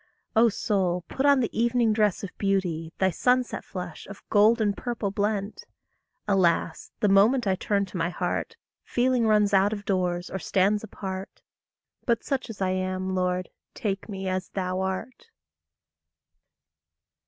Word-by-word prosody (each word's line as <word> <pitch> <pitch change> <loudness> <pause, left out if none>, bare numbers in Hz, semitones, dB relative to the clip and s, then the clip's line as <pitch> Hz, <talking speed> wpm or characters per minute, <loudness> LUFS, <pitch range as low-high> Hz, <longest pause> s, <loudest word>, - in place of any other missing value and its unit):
O 230 +1 +6
soul, 185 -4 0
put 270 +2 0
on 280 -2 +5
the 235 - -2
evening 235 -1 +2
dress 210 -3 +1
of 195 - -7
beauty, 180 -5 0
Thy 190 0 +2
sunset 250 +6 +1
flush, 180 -3 -7
of 200 0 -12
gold 215 +3 +5
and 205 -2 +1
purple 235 -5 -3
blent! 205 0 -2 0.6
Alas, 175 -4 +1
the 210 - +4
moment 215 +6 +4
I 195 - +2
turn 200 +1 0
to 190 - -7
my 165 0 0
heart, - - -3 0.3
Feeling 245 -1 +1
runs 210 -2 +3
out 195 +2 +4
of 205 -1 -6
doors, 180 -2 -1
or 190 - -3
stands 200 +3 +1
apart! 190 -2 -7 0.6
But 235 -2 +1
such 265 -3 -2
as 200 -3 -4
I 185 - +1
am, 185 0 -2
Lord, 180 0 -1 0.2
take 205 -3 -3
me 195 -2 -4
as 185 0 -2
thou 185 -1 -2
art. 220 - -4
200 Hz, 155 wpm, -26 LUFS, 185-220 Hz, 0.6 s, O